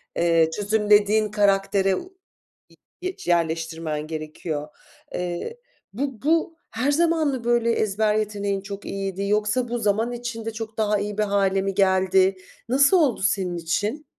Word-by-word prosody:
eee, 165 -1 +3
çözümlediğin 210 0 +3
karaktere 195 -2 +2
u 370 - -9 0.9
y 370 0 -3
yerleştirmen 160 -2 -1
gerekiyor. 155 -1 -5 0.5
Eee, 180 - -4 0.4
bu 265 0 -4
bu 325 +2 +1
her 255 +6 0
zaman 325 -1 +2
mı 260 -4 -3
böyle 235 -1 +2
ezber 215 -1 +1
yeteneğin 205 -2 -1
çok 200 0 -8
iyiydi 195 0 -3
yoksa 210 +4 +1
bu 240 +1 -2
zaman 220 +2 0
içinde 235 -2 -5
çok 220 0 -7
daha 210 -1 +2
iyi 205 +1 -4
bir 215 - +3
hâle 195 -1 +1
mi 195 0 -2
geldi? 190 0 +3 0.3
Nasıl 275 +8 +5
oldu 290 -8 +2
senin 190 -3 0
için? 205 - -2
205 Hz, 140 wpm, -24 LUFS, 190-235 Hz, 0.9 s, Nasıl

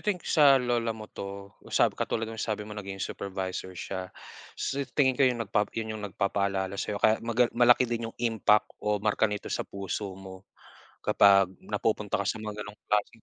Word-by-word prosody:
think 205 -5 -2
sa 145 -4 +6
lola 120 -3 0
mo 110 - -8
'to. 100 -1 -8 0.2
Sa - - +3
katulad 115 - -2
nung 110 -1 -6
sabi 105 -1 -2
mo 105 - -9
naging 100 -2 -6
supervisor 95 -1 -5
siya. 95 0 -5 0.5
Sa 140 +1 -2 0.2
tingin 130 -3 +4
ko - - -6
yun 125 -2 +3 0.4
yun 110 -1 -2
yung 105 - -6
nagpapaalala 100 -1 -1
sa'yo 105 - -2
kaya 110 +2 +3
maga 115 +1 +2
malaki 120 +1 +5
din 115 -1 -3
yung - - -13
impact 110 -3 +2
o 105 0 +1
marka 105 0 +2
nito 105 -1 -4
sa - - -3
puso 100 0 -4
mo 95 0 -11 0.6
kapag 100 -2 +5
napupunta 105 0 -1
ka 100 - -2
sa 110 - -2
mga 105 -1 -5
gano' 105 0 -9
ng 105 - -24
klaseng 105 +2 0
105 Hz, 185 wpm, -28 LUFS, 100-115 Hz, 0.6 s, sa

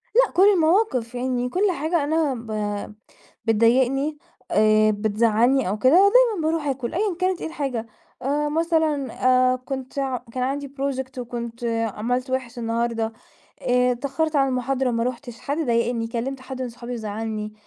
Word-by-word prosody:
لأ، - - +5
كل 370 - +3
المواقف 320 - +2
يعني 250 0 -1
كل 380 +7 +1
حاجة 315 0 0
أنا 305 -2 +1
ب 210 -3 -4 0.5
بتضايقني 260 +6 +2 0.3
آآ، 215 0 +4
بتزعلني 220 +3 +2
أو 210 +2 -2
كده، 255 +4 +4
دايمًا 400 -1 +5
باروح 320 -2 -1
آكُل 260 -2 -2
أيًا 390 -2 0
كانت 370 -1 0
إيه - - -3
الحاجة 270 -7 -3 0.4
آآ، 290 +3 0
مثلًا 315 -4 0 0.4
آآ - - 0
كنت 260 0 -6 0.4
كان 255 - -3
عندي 280 +2 -2
project 265 -1 -3
وكنت 235 -1 -6 0.3
عملت 250 +4 -2
وِحِش 255 -2 -3
النهاردة 230 -1 -1 0.5
آآ، 250 0 +3
اتأخرت 285 +5 -1
على 270 -1 +3
المحاضرة 255 0 0
ما 230 0 0
رُحتش 245 -1 -5
حد 285 +2 -3
ضايقني 235 -5 0
كلمت 260 +3 -3
حد 260 0 -6
من 250 - -3
صحابي 235 +1 -8
وزعلني. 215 -1 -4
255 Hz, 150 wpm, -23 LUFS, 230-290 Hz, 0.5 s, لأ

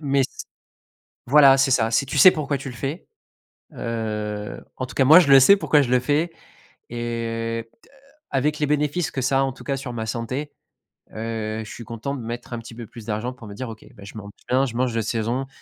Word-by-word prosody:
Mais, 140 -2 +2
c - - -8 0.8
voilà 140 0 +7
c'est 135 0 +3
ça, 115 -2 +3
si 120 +4 +2
tu 135 - -4
sais 185 - +10
pourquoi 145 -2 -2
tu 135 - -6
le 125 - -9
fais. 140 +8 -5 0.7
Heu, 105 -2 -4
en 130 - -3
tout - - -12
cas, 135 - +3
moi, 155 +6 +9
je 165 -6 +2
le 135 - +10
sais, 165 +10 +7
pourquoi 150 -4 +3
je 125 - -3
le 125 - +4
fais! 150 +7 0 0.6
Et, 115 -1 -3
t - - -24 0.4
avec 145 +3 0
les 150 - +1
bénéfices 150 +3 0
que 130 - -3
ça 135 +1 +2
a, - - +3
en 135 - -1
tout 130 - -14
cas, 140 - -1
sur 130 -2 -6
ma 110 -1 -3
santé, 125 +6 -4 0.6
heu, 110 0 -4
je 105 - -11
suis - - -8
content 115 +5 -5
de 135 - -6
mettre 120 +2 -7
un 120 - -3
petit 115 0 -10
peu 115 0 -8
plus 115 -1 -12
d'argent 110 +3 -3
pour 125 -3 -13
me 100 - -9
dire: 130 +4 -6
«OK, 110 - -12
bah 100 -3 -13
je 100 - -11
mange 100 -1 -9 0.2
bien, 130 +2 +2
je 115 -3 -6
mange 125 -1 0
de 115 - +1
saison.». 115 +4 -2
125 Hz, 235 wpm, -23 LUFS, 115-140 Hz, 0.8 s, sais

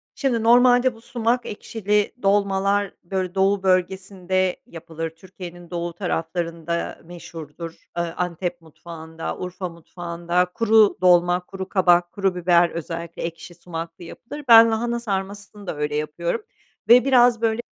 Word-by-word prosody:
Şimdi 240 -5 0
normalde 245 +1 +5
bu 225 - -16
sumak 240 +1 -1
ekşili 210 -1 -1
dolmalar, 200 0 +1
böyle, 185 0 -3
doğu 195 0 +2
bölgesinde 185 0 0
yapılır. 165 -1 -6
Türkiye'nin 175 0 -12
doğu 170 -1 -4
taraflarında 170 -1 -3
meşhurdur. 165 -1 -9 0.3
Iıı, 170 -1 -2
Antep 175 0 -3
mutfağında, 160 0 -8
Urfa 180 0 -5
mutfağında 170 +1 -2
kuru 220 -2 +4
dolma, 175 0 +4
kuru 190 0 -7
kabak, 175 -2 +3
kuru 195 -3 -1
biber 175 -1 +3
özellikle 170 0 -6
ekşi 165 +1 -7
sumaklı 165 0 -8
yapılır. 290 - -9
Ben, 230 -1 +8
lahana 235 +2 -1
sarmasını 200 -1 -5
da 160 - -3
öyle 150 0 -2
yapıyorum 170 +7 -2 0.5
ve 245 +2 +7
biraz, 245 -3 +4
böyle, 225 0 +1
180 Hz, 130 wpm, -22 LUFS, 170-205 Hz, 0.5 s, Ben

